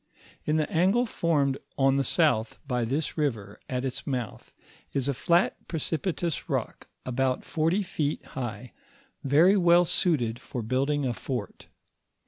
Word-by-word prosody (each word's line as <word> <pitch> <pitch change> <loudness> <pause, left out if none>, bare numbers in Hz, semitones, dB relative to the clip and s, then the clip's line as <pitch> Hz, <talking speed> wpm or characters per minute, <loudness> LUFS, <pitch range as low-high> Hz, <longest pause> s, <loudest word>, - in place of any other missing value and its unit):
In 155 +1 +1
the 155 - +1
angle 195 +9 +3
formed 145 - 0 0.2
on 135 0 +3
the 140 - +2
south 135 -6 +2
by 125 -3 0
this 145 +6 -2
river, 110 -9 -2
at 125 0 -2
its 130 - -4
mouth, 125 -6 -4 0.4
is 135 -1 0
a 140 - +1
flat 170 +7 +1
precipitous 165 0 -2
rock, - - -3 0.2
about 130 0 0
forty 165 +6 +1
feet 150 -5 -2
high, 125 -2 -6 0.5
very 155 +8 +5
well 175 -2 +5
suited 125 -10 +1
for 120 - -5
building 135 +5 0
a 125 - 0
fort. 105 - -5
140 Hz, 140 wpm, -27 LUFS, 125-165 Hz, 0.5 s, very